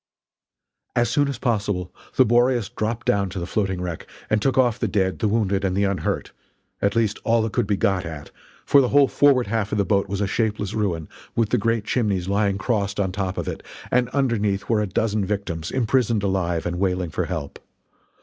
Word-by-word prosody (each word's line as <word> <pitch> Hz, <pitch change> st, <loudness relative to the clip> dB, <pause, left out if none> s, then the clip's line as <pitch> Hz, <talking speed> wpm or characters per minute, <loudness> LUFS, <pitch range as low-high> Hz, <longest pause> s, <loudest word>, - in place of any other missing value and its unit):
As 120 Hz, -2 st, +2 dB
soon 145 Hz, +2 st, +2 dB
as 140 Hz, -3 st, -3 dB
possible 105 Hz, -7 st, -1 dB, 0.2 s
the 130 Hz, -, +5 dB
Boreas 120 Hz, -1 st, +2 dB
dropped 115 Hz, +2 st, -3 dB
down 100 Hz, -1 st, +1 dB
to 95 Hz, -, -5 dB
the 85 Hz, -, -3 dB
floating 95 Hz, -1 st, -1 dB
wreck 90 Hz, -2 st, -5 dB, 0.2 s
and 110 Hz, -1 st, +3 dB
took 135 Hz, +4 st, +1 dB
off 125 Hz, -3 st, +3 dB
the 115 Hz, -, 0 dB
dead, 95 Hz, -1 st, 0 dB
the 110 Hz, -, +1 dB
wounded 100 Hz, -2 st, +1 dB
and 95 Hz, -1 st, 0 dB
the 100 Hz, -, +2 dB
unhurt 100 Hz, -1 st, -1 dB, 0.5 s
at 100 Hz, 0 st, +1 dB
least 110 Hz, -3 st, +1 dB
all 115 Hz, 0 st, +3 dB
that 110 Hz, -, -3 dB
could 120 Hz, -5 st, +1 dB
be 100 Hz, -1 st, +1 dB
got 95 Hz, -1 st, +1 dB
at, 80 Hz, -3 st, -8 dB, 0.3 s
for 140 Hz, -, +6 dB
the 130 Hz, -, +2 dB
whole 140 Hz, -1 st, +5 dB
forward 135 Hz, -4 st, +4 dB
half 110 Hz, -3 st, -1 dB
of 105 Hz, -, 0 dB
the 100 Hz, -, +2 dB
boat 100 Hz, +1 st, +1 dB
was 100 Hz, 0 st, -2 dB
a 100 Hz, -, +1 dB
shapeless 105 Hz, -1 st, -1 dB
ruin, 90 Hz, -7 st, -1 dB, 0.3 s
with 115 Hz, -2 st, +1 dB
the 125 Hz, -, +2 dB
great 115 Hz, +1 st, 0 dB
chimneys 100 Hz, -8 st, 0 dB
lying 100 Hz, 0 st, +1 dB
crossed 100 Hz, -2 st, -1 dB
on 95 Hz, -2 st, 0 dB
top 95 Hz, -1 st, -3 dB
of -, -, -3 dB
it, -, -, -4 dB, 0.3 s
and 125 Hz, -1 st, +2 dB
underneath 115 Hz, -8 st, 0 dB
were 110 Hz, -2 st, +2 dB
a 105 Hz, -, -1 dB
dozen 105 Hz, +2 st, 0 dB
victims 95 Hz, -5 st, -3 dB
imprisoned 120 Hz, -3 st, +1 dB
alive 90 Hz, -4 st, 0 dB
and 90 Hz, 0 st, -2 dB
wailing 90 Hz, -3 st, 0 dB
for -, -, -1 dB
help. 70 Hz, -, -5 dB
105 Hz, 210 wpm, -23 LUFS, 95-115 Hz, 0.5 s, for